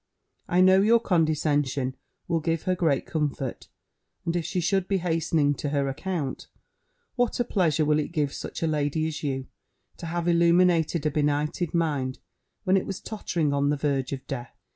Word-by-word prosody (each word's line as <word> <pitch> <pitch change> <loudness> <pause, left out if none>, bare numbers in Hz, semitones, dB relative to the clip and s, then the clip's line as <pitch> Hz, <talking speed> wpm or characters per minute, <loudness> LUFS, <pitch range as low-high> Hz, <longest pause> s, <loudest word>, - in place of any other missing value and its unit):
I 180 +1 +3
know 190 +1 +6
your 230 +3 +5
condescension 145 - +1 0.3
will 170 -1 +1
give 165 0 -1
her 185 - +1
great 165 -6 +1
comfort; 145 -5 -3 0.6
and 170 - -1
if 170 -2 -1
she 185 - -1
should 190 +2 +1
be 195 - +1
hastening 165 -4 +1
to 145 +1 -4
her 140 -1 0
account, 150 0 -3 0.7
what 245 -1 0
a - - +4
pleasure 165 - +1
will 150 0 +3
it 150 - -3
give 150 -4 -1
such - - -6
a - - +2
lady 150 0 0
as 160 -1 -4
you, 135 -3 -2 0.5
to 165 - -7
have 170 +1 -2
illuminated 170 -2 +3
a 155 - +2
benighted 150 +3 0
mind, 145 -6 0 0.5
when 185 +1 +3
it - - -2
was 195 - -4
tottering 170 -8 -2
on 140 0 +2
the 145 - +1
verge 140 -3 -1
of 135 -1 -5
death! 120 -3 -6
160 Hz, 180 wpm, -26 LUFS, 145-175 Hz, 0.7 s, know